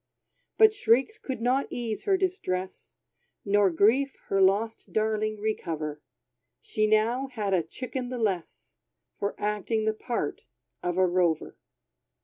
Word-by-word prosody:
But 440 -1 +7
shrieks 405 - +2
could 255 -4 -5
not 260 +3 +2
ease 230 -3 -4
her 390 -2 +3
distress, 190 - -3 0.5
Nor 205 -1 +4
grief 235 +10 +3
her 195 - +2
lost 205 +4 +1
darling 215 0 0
recover. 160 -8 -3 0.6
She 215 0 0
now 225 +5 +2
had 215 -7 -2
a 180 - +4
chicken 250 - -5
the 250 - -4
less, 195 -7 -3 0.4
For 200 - -2
acting 210 +1 -1
the 220 - +2
part 235 +2 -3 0.4
of 180 0 -2
a 185 - +5
rover. 175 -3 +1
215 Hz, 130 wpm, -27 LUFS, 190-245 Hz, 0.6 s, But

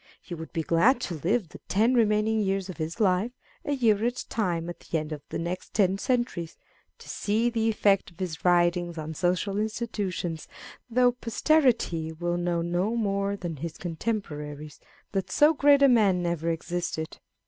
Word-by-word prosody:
He 175 - -9
would 160 -1 -7
be 165 -2 -2
glad 205 - +4
to 180 - -3
live 195 +2 0
the - - -12
ten 225 +6 +3
remaining 220 -1 +2
years 195 -2 -1
of - - -12
his 160 +5 -4
life, 200 +3 +2 0.3
a 290 - -1
year 225 -6 +2
at 245 +1 0
a - - -6
time 175 -7 -1
at 175 - -7
the 165 - -3
end 155 0 -4
of 150 -1 -5
the - - -3
next 175 +2 -5
ten 195 -2 +3
centuries, 240 -11 -1 0.4
to - - -15
see 220 +3 0
the 225 -1 +1
effect 200 -3 +2
of 170 0 -23
his 180 -4 -4
writings 175 -1 +2
on 155 0 -5
social 180 +5 0
institutions, 205 -7 -3 0.4
though 245 +1 +4
posterity 235 - +1
will 175 +2 -2
know 175 -1 0
no 180 +6 0
more 200 -2 0
than 175 -5 -5
his 160 +3 -6
contemporaries 155 -6 -4 0.3
that 195 -2 -2
so 300 +2 +5
great 285 -1 +5
a - - +8
man 200 -8 +3
ever 170 -1 -1
existed. 165 -1 -3
185 Hz, 180 wpm, -27 LUFS, 170-225 Hz, 0.4 s, a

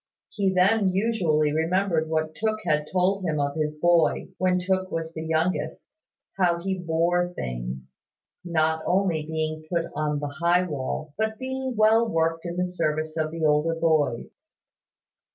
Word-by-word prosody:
He 195 -2 0
then 190 +2 +3
usually 180 -7 +1
remembered 165 0 +1
what 155 0 -1
Mr - - -33
Tooke 215 0 -1
had 150 -2 +1
told 190 +2 +1
him 155 -4 -1
of 140 0 0
his 150 -1 -2
boy, 170 +1 +2
when 185 0 +2
Tooke 185 +1 0
was 165 0 -4
the 160 - -5
youngest, 160 -1 -1 0.6
how 175 -2 +3
he 190 +1 -2
bore 175 +1 +1
things 60 +1 -6 0.4
not 160 -2 +1
only 180 -4 +1
being 155 0 -3
put 170 -1 +1
on 150 0 -1
the 145 -1 -5
high 175 +1 +3
wall, 150 -1 -4
but 220 0 0
being 260 0 -4
well 220 +2 +4
worked 165 -1 0
in 170 +1 -5
the 180 - +1
service 155 -3 -2
of 155 -1 0
the 165 0 -2
older 150 +2 +2
boys. 155 -7 +1
165 Hz, 160 wpm, -25 LUFS, 155-185 Hz, 0.6 s, well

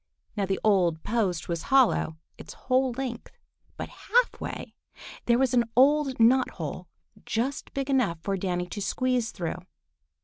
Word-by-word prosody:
Now 200 -3 -1
the 195 - -1
old 180 -6 +2
post 205 -7 -1
was 170 -1 -2
hollow 255 -11 +3 0.2
its - - -11
whole 255 0 +1
length, 245 -2 -6 0.4
but - - -5
half - - 0
way - - -6 0.5
there 235 0 +4
was 260 -1 +1
an 240 -1 +4
old 275 0 +4
knot 250 +3 +5
hole - - -5 0.4
just 250 +5 -2
big 275 -1 -2
enough 255 -11 +1
for 195 - -1
Danny 180 -2 -2
to 190 +4 -6
squeeze 250 +1 0
through. 175 -1 -4
235 Hz, 150 wpm, -27 LUFS, 190-260 Hz, 0.5 s, knot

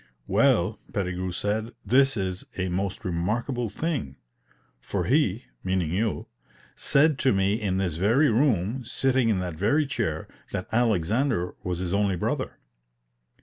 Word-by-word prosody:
'Well,' - - +2
Pettigrew 90 -1 -2
said, 110 +5 -2
'this 135 0 +4
is 95 -2 -2
a 95 -1 -1
most 95 +3 -3
remarkable 110 +8 -1
thing; 135 - -3 0.6
for - - -2
he,' - - +2 0.2
meaning 90 -4 0
you, 105 +4 -1 0.5
'said 145 0 +3
to 130 - +3
me 95 0 +2
in 95 -3 0
this 90 -5 -1
very 115 - +4
room, 115 -1 +1
sitting 130 0 +1
in 105 - +2
that 90 -2 -3
very 125 - +2
chair, 105 - -2 0.3
that 95 -2 -3
Alexander 110 - +1
was 90 -2 -2
his 90 0 -3
only 100 -1 +2
brother.' - - -2
100 Hz, 140 wpm, -26 LUFS, 90-120 Hz, 0.6 s, this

